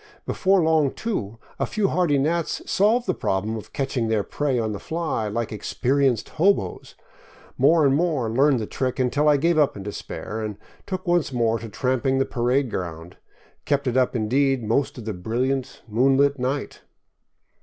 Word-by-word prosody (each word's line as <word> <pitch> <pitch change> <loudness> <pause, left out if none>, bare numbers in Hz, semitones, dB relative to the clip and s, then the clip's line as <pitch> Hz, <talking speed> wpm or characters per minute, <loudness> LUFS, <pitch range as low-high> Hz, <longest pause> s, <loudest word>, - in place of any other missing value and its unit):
Before 190 -2 +2
long, 160 -3 +3
too, 115 - -3 0.2
a - - 0
few 205 -3 0
hardy 175 -6 +2
gnats 160 +4 -1
solved 225 +5 +2
the 185 - +1
problem 105 - -1
of 110 - -8
catching 135 -4 -1
their 110 -2 +1
prey 140 +1 -1
on 110 -2 -1
the 100 - -5
fly, 160 -9 -2
like 115 +2 -3
experienced 125 +3 0
" - - -19
hoboes." 170 - +1 0.6
More 155 +4 +4
and 135 - +4
more 150 -6 +1
learned 135 +4 +3
the 110 - -3
trick, 130 +3 -3
until 140 +4 +2
I 145 - +5
gave 165 +3 +2
up 145 -7 +2
in 100 - -7
despair 105 +2 -6
and 105 -2 -4 0.3
took 185 -1 -4
once 175 -4 +2
more 115 -2 +1
to 115 - -8
tramping 130 +4 0
the 135 - +2
parade 125 +1 0
ground; 85 0 -6 0.5
kept 140 -1 0
it 125 -2 -1
up, 130 -1 +2
indeed, 130 +3 +1
most 115 +7 0
of 120 - -8
the 110 - -3
brilliant, 125 +8 -2
moonlit 135 +5 +3
night. 135 +3 -3
130 Hz, 175 wpm, -23 LUFS, 110-150 Hz, 0.6 s, I